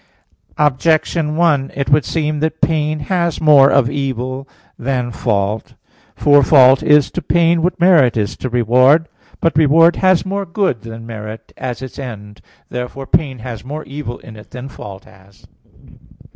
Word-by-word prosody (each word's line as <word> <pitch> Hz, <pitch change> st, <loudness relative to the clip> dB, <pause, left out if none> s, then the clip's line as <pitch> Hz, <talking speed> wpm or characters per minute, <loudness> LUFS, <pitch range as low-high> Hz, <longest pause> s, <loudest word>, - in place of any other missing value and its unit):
Objection 150 Hz, +2 st, 0 dB
1: 150 Hz, -5 st, +1 dB
It 140 Hz, 0 st, -3 dB
would 145 Hz, 0 st, +4 dB
seem 155 Hz, -2 st, -2 dB
that 160 Hz, +1 st, -2 dB
pain 155 Hz, -1 st, 0 dB
has 170 Hz, 0 st, -1 dB
more 145 Hz, -3 st, +6 dB
of 135 Hz, -4 st, +3 dB
evil 130 Hz, -1 st, -4 dB, 0.3 s
than 125 Hz, -1 st, -2 dB
fault. 105 Hz, -1 st, -2 dB, 0.4 s
For 145 Hz, 0 st, +4 dB
fault 130 Hz, -1 st, +5 dB
is 150 Hz, -2 st, +3 dB
to -, -, -4 dB
pain 170 Hz, +1 st, +2 dB
what 180 Hz, +2 st, -1 dB
merit 165 Hz, -10 st, +4 dB
is 105 Hz, -1 st, -2 dB
to 130 Hz, -, -5 dB
reward. 130 Hz, +7 st, +3 dB, 0.3 s
But 165 Hz, -, +1 dB
reward 160 Hz, +2 st, +4 dB
has 185 Hz, -2 st, +2 dB
more 195 Hz, +1 st, -3 dB
good 170 Hz, -, -1 dB
than 115 Hz, 0 st, -10 dB
merit, 110 Hz, -1 st, -9 dB
as 130 Hz, 0 st, -6 dB
its 130 Hz, -, -9 dB
end. 105 Hz, -6 st, -9 dB, 0.3 s
Therefore 125 Hz, +2 st, -6 dB
pain 135 Hz, -2 st, -1 dB
has 115 Hz, -4 st, -7 dB
more 150 Hz, +4 st, -7 dB
evil 140 Hz, -4 st, -7 dB
in 110 Hz, -, -14 dB
it 105 Hz, -, -15 dB
than 125 Hz, +2 st, -9 dB
fault 100 Hz, -6 st, -11 dB
has. 95 Hz, +1 st, -21 dB
135 Hz, 160 wpm, -16 LUFS, 120-155 Hz, 0.4 s, more